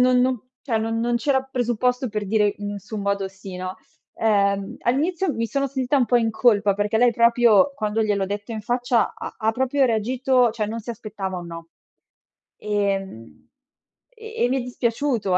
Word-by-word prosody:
non 250 Hz, 0 st, +4 dB
non 255 Hz, -3 st, +1 dB, 0.2 s
cioè 230 Hz, -6 st, 0 dB
non 225 Hz, +1 st, -1 dB
non 240 Hz, +1 st, +1 dB
c'era 265 Hz, +2 st, +1 dB
presupposto 250 Hz, -1 st, -1 dB
per 210 Hz, -2 st, -3 dB
dire 210 Hz, 0 st, +2 dB
in 205 Hz, 0 st, -4 dB
nessun 205 Hz, +1 st, -6 dB
modo 200 Hz, -1 st, 0 dB
sì, 190 Hz, -1 st, -10 dB
no. 185 Hz, +1 st, -5 dB, 0.4 s
Ehm, 200 Hz, -2 st, +1 dB
all'inizio 320 Hz, +7 st, 0 dB
mi 230 Hz, 0 st, -1 dB
sono 275 Hz, +3 st, -1 dB
sentita 265 Hz, +1 st, 0 dB
un 250 Hz, -3 st, +3 dB
po' 245 Hz, -, +3 dB
in 225 Hz, -1 st, +2 dB
colpa, 210 Hz, -3 st, +3 dB
perché 205 Hz, +2 st, 0 dB
lei 245 Hz, 0 st, +5 dB
proprio 235 Hz, +1 st, +4 dB
quando 215 Hz, -2 st, -1 dB
gliel'ho 200 Hz, -2 st, 0 dB
detto 205 Hz, +3 st, -5 dB
in 215 Hz, -, -4 dB
faccia 245 Hz, +1 st, +1 dB
ha -, -, -7 dB
ha 220 Hz, 0 st, 0 dB
proprio 265 Hz, +3 st, +1 dB
reagito 250 Hz, +2 st, +2 dB
cioè 215 Hz, -2 st, -2 dB
non 230 Hz, +2 st, -4 dB
si 230 Hz, +2 st, -7 dB
aspettava 200 Hz, -4 st, -5 dB
un 175 Hz, -, -8 dB
no; 165 Hz, 0 st, -9 dB, 0.9 s
ehm, 195 Hz, -, -3 dB, 0.6 s
e 450 Hz, -, -5 dB
e -, -, +1 dB
mi 265 Hz, -, +1 dB
è -, -, -1 dB
dispiaciuto, 235 Hz, -5 st, 0 dB
225 Hz, 185 wpm, -23 LUFS, 205-250 Hz, 0.9 s, lei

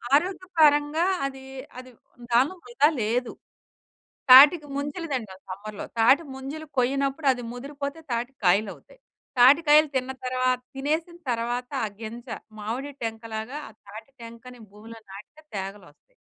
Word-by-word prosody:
ఆరోగ్య 370 Hz, +5 st, 0 dB
పరంగా 295 Hz, +1 st, +4 dB, 0.2 s
అది 270 Hz, -1 st, -6 dB, 0.4 s
అది 255 Hz, 0 st, -12 dB, 0.4 s
దాంట్లో 260 Hz, +9 st, +3 dB
వృదా 435 Hz, -9 st, +3 dB
లేదు. 235 Hz, +3 st, -1 dB, 1.0 s
తాటిక 295 Hz, +5 st, +9 dB
ముంజలు 290 Hz, +5 st, -4 dB
దింటాం 210 Hz, -7 st, -5 dB
సమ్మర్‌లో, 205 Hz, +2 st, -7 dB
తాటి 265 Hz, +8 st, +5 dB
ముంజలు 275 Hz, +4 st, -7 dB
కొయ్యనప్పుడు 275 Hz, +3 st, 0 dB
అది 245 Hz, -1 st, -8 dB
ముదిరిపోతే 280 Hz, +4 st, -6 dB
తాటి 240 Hz, +2 st, -2 dB
కాయలవుతాయి. 200 Hz, -, 0 dB, 0.4 s
తాటికాయలు 295 Hz, +4 st, +6 dB
తిన్న 260 Hz, 0 st, -1 dB
తర్వా 255 Hz, 0 st, 0 dB, 0.3 s
తినేసిన 315 Hz, +5 st, -2 dB
తర్వాత 240 Hz, +2 st, -2 dB, 0.2 s
ఆ -, -, -2 dB
గింజ 235 Hz, +3 st, -8 dB, 0.3 s
మామిడి 240 Hz, +7 st, -4 dB
టెంకలాగా 225 Hz, +3 st, -5 dB
ఆ -, -, -15 dB, 0.2 s
తాటి 215 Hz, +4 st, -11 dB
టెంకని 235 Hz, +2 st, -11 dB
భూమిలో 225 Hz, +2 st, -12 dB
నాటితే 210 Hz, +11 st, -13 dB
తేగలొస్తాయి. 195 Hz, -, -9 dB
255 Hz, 120 wpm, -25 LUFS, 225-290 Hz, 1.0 s, తాటిక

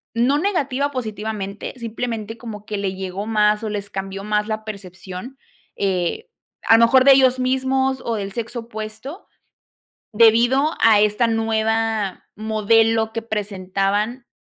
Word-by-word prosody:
no 255 Hz, +5 st, +2 dB
negativa, 285 Hz, -7 st, 0 dB
positivamente, 215 Hz, -5 st, -5 dB
simplemente 230 Hz, -1 st, -4 dB
como 215 Hz, -3 st, -9 dB
que 210 Hz, -, -4 dB
le 195 Hz, -1 st, -2 dB
llegó 190 Hz, +2 st, -5 dB
más, 210 Hz, -1 st, +2 dB
o 220 Hz, -, -2 dB
les 205 Hz, -1 st, -4 dB
cambió 195 Hz, 0 st, -5 dB
más 210 Hz, 0 st, 0 dB
la 215 Hz, -1 st, -4 dB
percepción, 195 Hz, +4 st, -8 dB, 0.4 s
eh, 195 Hz, -, -1 dB, 0.4 s
a 225 Hz, -, +7 dB
lo 230 Hz, -, +6 dB
mejor 260 Hz, +2 st, +5 dB
de 275 Hz, -, +9 dB
ellos 260 Hz, -1 st, +4 dB
mismos 265 Hz, +1 st, 0 dB
o 230 Hz, -, -1 dB
del 200 Hz, -2 st, -4 dB
sexo 235 Hz, +2 st, -4 dB
opuesto, 220 Hz, -, -8 dB, 0.9 s
debido 240 Hz, +7 st, +4 dB
a 220 Hz, -2 st, +6 dB
esta 210 Hz, +3 st, +2 dB
nueva 225 Hz, -2 st, 0 dB
modelo 220 Hz, +1 st, +2 dB
que 230 Hz, -, -3 dB
presentaban, 205 Hz, +2 st, -2 dB
220 Hz, 135 wpm, -21 LUFS, 210-240 Hz, 0.9 s, de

